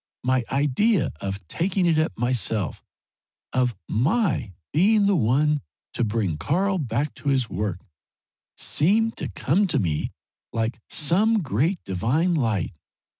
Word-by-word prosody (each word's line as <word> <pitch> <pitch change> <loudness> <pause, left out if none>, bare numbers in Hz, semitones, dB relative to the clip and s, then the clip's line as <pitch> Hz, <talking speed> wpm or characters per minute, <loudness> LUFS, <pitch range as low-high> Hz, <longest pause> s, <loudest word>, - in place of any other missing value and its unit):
My 130 0 +2
idea 150 - +2
of 100 -2 -5
taking 180 - 0
it 165 -2 +3
up 160 - -1
myself, 115 -6 0 0.7
of 125 -3 +1
my 160 - +1 0.2
being 205 +6 +4
the 200 0 +3
one 145 +3 +2 0.3
to - - 0
bring 105 -7 -1
Karl 190 - +1
back 140 +1 -1
to 145 - -4
his 130 -4 +1
work, 95 -1 -3 0.7
seemed 220 +8 +2
to - - -4
come 190 +9 +1
to 160 - 0
me 80 - -1 0.4
like 115 0 -2
some 200 +7 +2
great 150 - 0
divine 120 - +1
light. 110 - 0
140 Hz, 130 wpm, -24 LUFS, 110-180 Hz, 0.7 s, being